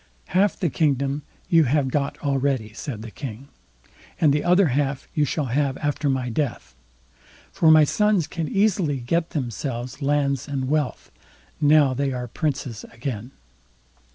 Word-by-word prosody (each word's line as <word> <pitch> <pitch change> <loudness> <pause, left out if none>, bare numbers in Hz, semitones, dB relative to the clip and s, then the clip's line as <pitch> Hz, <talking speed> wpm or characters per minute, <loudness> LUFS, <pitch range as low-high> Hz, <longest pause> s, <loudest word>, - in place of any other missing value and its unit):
"Half 195 +3 +2
the 170 -5 0
kingdom 140 -2 +1 0.3
you 165 -2 +5
have 135 +1 +1
got 140 +1 -1
already", 135 -6 0
said 115 -2 -6
the 115 - -8
King, 135 +1 -8 0.7
"and 150 -4 +4
the 150 - 0
other 180 0 +4
half 135 +1 -1
you 150 - +2
shall 145 +2 -1
have 140 -1 +1
after 145 -1 -1
my 130 -2 0
death; 125 +2 -3 0.8
for 160 - +3
my 155 -1 +8
sons 210 +2 +2
can 165 0 -4
easily 190 -6 +1
get 165 +7 -1
themselves 125 -1 -4
lands 140 -2 0
and 135 -2 -2
wealth, 150 -2 -1 0.5
now 145 -2 +5
they 135 +1 -1
are 125 -1 -4
princes 135 -3 -3
again." 115 -1 -5
140 Hz, 150 wpm, -23 LUFS, 130-155 Hz, 0.8 s, my